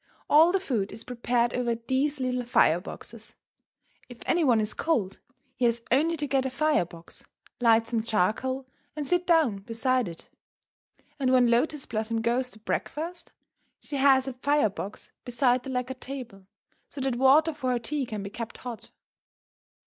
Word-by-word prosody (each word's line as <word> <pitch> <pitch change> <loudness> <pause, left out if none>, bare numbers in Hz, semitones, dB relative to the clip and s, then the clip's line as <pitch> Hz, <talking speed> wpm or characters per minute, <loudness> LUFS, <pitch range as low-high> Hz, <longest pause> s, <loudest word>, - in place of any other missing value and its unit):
All 320 +4 +6
the 390 - +2
food 230 - -2
is 225 - -8
prepared 240 0 0
over 240 -2 0
these 265 +5 -1
little 250 -1 -1
fire 175 -8 +3
boxes. 180 - -10 0.7
If 245 - -10
any 345 -1 +2
one 245 -6 +4
is 210 0 -1
cold, 225 - -1 0.4
he 250 - 0
has 235 0 +1
only 320 +6 +3
to 295 - -2
get 270 -2 +1
a 265 - -1
fire 300 - +1
box, 170 0 -12 0.4
light 230 -2 +4
some 230 -1 0
charcoal, 230 +5 0 0.3
and 295 -2 -4
sit 355 +2 +1
down 320 - +3
beside 230 +3 0
it. 165 -1 -9 0.9
And 260 -2 +1
when 250 -2 +5
Lotus 270 +4 +1
Blossom 225 0 -2
goes 250 +2 +1
to 220 - -10
breakfast, 325 +10 -4 0.5
she 285 - -6
has 270 -1 +4
a 265 - -3
fire 280 -3 +1
box 200 +1 -7
beside 245 0 +2
the 270 - -8
lacquered 255 0 -3
table, 240 -8 -8 0.4
so - - -9
that 260 -2 -1
water 290 +5 +5
for 280 -4 -3
her 250 - +2
tea 270 +3 -3
can 210 -3 -5
be 200 - -7
kept 230 +1 -6
hot. 245 -3 -8
250 Hz, 170 wpm, -27 LUFS, 230-275 Hz, 0.9 s, All